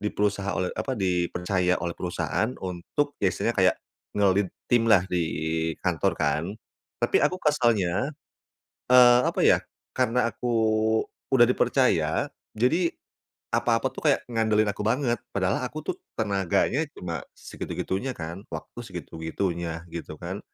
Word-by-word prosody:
Di 105 - 0
perusaha 100 -1 0
oleh 90 -1 0
apa? 130 -2 -3
Dipercaya 90 -1 +1
oleh 85 0 -2
perusahaan 90 +5 -1
untuk 95 +11 -3
ya 100 - +4
istilahnya 115 - 0
kayak 95 -1 +4 0.4
nge-lead 100 -1 +3 0.2
tim 115 -1 +3
lah 100 -5 +6
di 90 -2 0 0.6
kantor 90 -5 +1
kan. 75 +2 +1 0.6
Tapi - - +2
aku 185 - +2
kesalnya, 115 - +2 0.8
eee, 125 -1 +8
apa - - -1
ya, - - +6 0.4
karena 125 -1 +2
aku 120 +3 -3 0.8
udah 120 -2 +8
dipercaya, 125 - +2 0.3
jadi 160 +10 +2 0.6
apa-apa - - +2
tuh - - -6
kayak - - 0
ngandelin 110 -2 +2
aku - - -3
banget. 120 +2 +1 0.2
Padahal 100 +5 0
aku 150 +5 -5
tuh - - -1 0.2
tenaganya 100 - +1
cuma 85 -6 -5
segitu-gitunya 120 +8 -4
kan, 85 +4 -6
waktu - - -7
segitu-gitunya 85 -2 -4
gitu 80 -2 -7
kan. 95 +3 -5
100 Hz, 130 wpm, -26 LUFS, 90-120 Hz, 0.8 s, eee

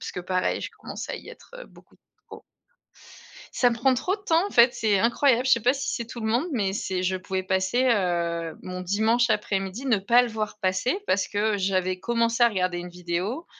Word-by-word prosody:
puisque 180 - -6
pareil 185 +1 -1
je - - -4
commençais - - -7
à - - -3
y - - -12
être, - - -14
heu, - - -9
beaucoup - - -20 0.3
trop. - - -12 1.1
Ça 245 - +3
me - - -1
prend 255 +3 +2
trop 360 +10 -1
de - - -21
temps 335 0 +2
en - - -7
fait, 240 +1 +5
c'est 210 -3 +1
incroyable. 240 +3 +2
Je - - +4
sais 230 - +4
pas 245 +4 +3
si 280 - -4
c'est 235 - -4
tout 235 0 -8
le 220 - -3
monde, 245 +8 +1
mais 200 -7 0
c'est 190 -2 -3
je 185 +1 0
pouvais 185 0 -3
passer, 190 +6 0
heu, 170 -6 0
mon 185 0 -6
dimanche 220 +6 +1
après-midi, 200 +3 -2
ne 235 -6 +3
pas 235 +6 +4
le 245 - -2
voir 215 -1 -4
passer 190 - 0
parce 185 -1 +1
que 210 +1 0
j'avais 185 -1 0
commencé 230 +2 0
à 235 - +7
regarder 185 -4 -1
une 175 +1 -6
vidéo 180 - -4
210 Hz, 220 wpm, -25 LUFS, 185-240 Hz, 1.1 s, à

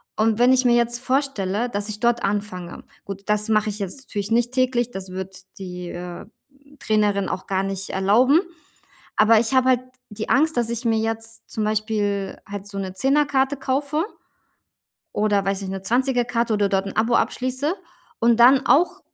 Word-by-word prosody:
und 220 0 +2
wenn 250 +2 +6
ich 255 - +3
mir 240 - +5
jetzt 235 0 +1
vorstelle, 245 -5 -1
dass 205 -1 -3
ich 210 0 -5
dort 240 +1 +1
anfange 195 -3 -3 0.2
gut, 195 0 -7
das 210 +1 0
mache 215 0 +2
ich 210 - -7
jetzt 200 +6 -5
natürlich 205 -1 -4
nicht 240 +1 +2
täglich, 250 -2 +1
das 190 -3 -7
wird 190 0 -6 0.2
die, 180 -2 -7
äh, 175 0 -7 0.5
Trainerin 210 -2 +1
auch 185 - -5
gar 190 0 0
nicht 195 0 -4
erlauben. 230 - +4 0.8
Aber 215 +1 +5
ich 235 +3 -1
habe 260 0 +4
halt 255 -2 +4 0.3
die 210 +1 -6
Angst, 315 +3 +3
dass 235 -1 +1
ich 235 +1 -3
mir 225 -1 +2
jetzt 225 0 -4
zum 220 - -3
Beispiel 210 -2 -1
halt 200 0 -7
so 200 -1 -7
'ne 190 -1 -4
Zehnerkarte 275 +3 +1
kaufe 285 +4 -1 1.1
oder, 205 -2 +1
weiß 195 0 -1
nicht, 190 - -5
'ne 190 0 -5
Zwanzigerkarte 240 0 +1
oder 205 -1 +2
dort 195 0 0
'n 195 - -7
Abo 230 +2 +2
abschließe 260 +6 -1 0.5
und 235 0 +4
dann 260 +2 +7
auch 345 +5 +3
220 Hz, 180 wpm, -22 LUFS, 200-245 Hz, 1.1 s, dann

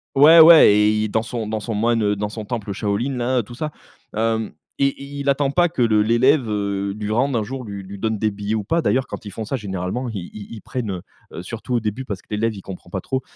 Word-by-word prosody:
ouais, 155 +5 +8
ouais 160 -8 +9
et 105 +1 +3
dans 110 +1 0
son 115 -1 -4
dans 110 0 -2
son 115 +2 -4
moine, 115 +1 +1
heu, 105 0 +2
dans 105 +1 -3
son 110 0 -7
temple 110 -3 -4
Shaolin 110 +7 -2
là, 125 +1 +1
tout 120 +4 -11
ça. 150 +3 -4 0.4
Hem 110 0 0 0.3
et 140 0 +2
il 140 +1 -8
il 140 - 0
attend 140 0 +1
pas 175 +3 +3
que 160 -6 -3
le 110 -2 +3
l'élève, 120 +4 +3
heu, 100 -1 -2
lui 105 0 -3
rende 130 +4 +1
un 110 - +1
jour 130 +4 -6
lui 100 -3 -7
lui 100 +1 -9
donne 110 +1 -1
des 110 +1 0
billets 105 +2 -3
ou 110 - -2
pas. 165 +11 0
D'ailleurs, 130 -3 +1
quand - - -8
ils - - -5
font 110 - -5
ça 125 - -2
généralement 100 +2 -3
ils 95 -6 -6
ils 105 +1 -9
prennent, 115 -2 -4
heu 90 -2 -5 0.3
heu, - - -6
surtout 115 +5 -4
au - - +3
début, 110 +4 -4
parce 100 -6 -5
que - - -33
l'élève 110 +1 0
il 100 - -8
comprend 90 -2 -9
pas 95 - -3
trop, 130 +5 -2
110 Hz, 260 wpm, -21 LUFS, 105-130 Hz, 0.4 s, ouais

